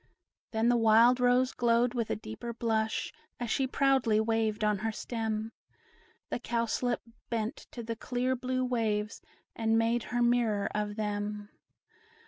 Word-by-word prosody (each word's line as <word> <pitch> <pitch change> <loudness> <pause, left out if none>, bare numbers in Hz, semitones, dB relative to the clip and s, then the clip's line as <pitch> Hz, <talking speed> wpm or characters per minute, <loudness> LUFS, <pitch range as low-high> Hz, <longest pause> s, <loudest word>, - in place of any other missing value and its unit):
Then 225 +1 +1
the 240 0 +4
wild 230 +2 +5
rose 250 +1 +3
glowed 240 0 +2
with 235 -3 -2
a - - 0
deeper 215 - -7
blush, 220 -1 -1 0.3
As 240 -2 -3
she 270 -2 +1
proudly 265 -5 +2
waved 220 -1 0
on 210 -2 +2
her 225 +2 -1
stem; 220 -1 -3 0.8
The - - -1
Cowslip 235 0 -1 0.3
bent 230 +3 -3
to 235 - -7
the 230 0 -4
clear 250 +2 -1
blue 255 0 -1
waves, 220 -3 -1 0.3
And 225 0 +2
made 230 +1 +2
her 240 0 0
mirror 235 -4 +2
of 210 0 -2
them. 210 -1 -3
230 Hz, 145 wpm, -30 LUFS, 215-245 Hz, 0.8 s, wild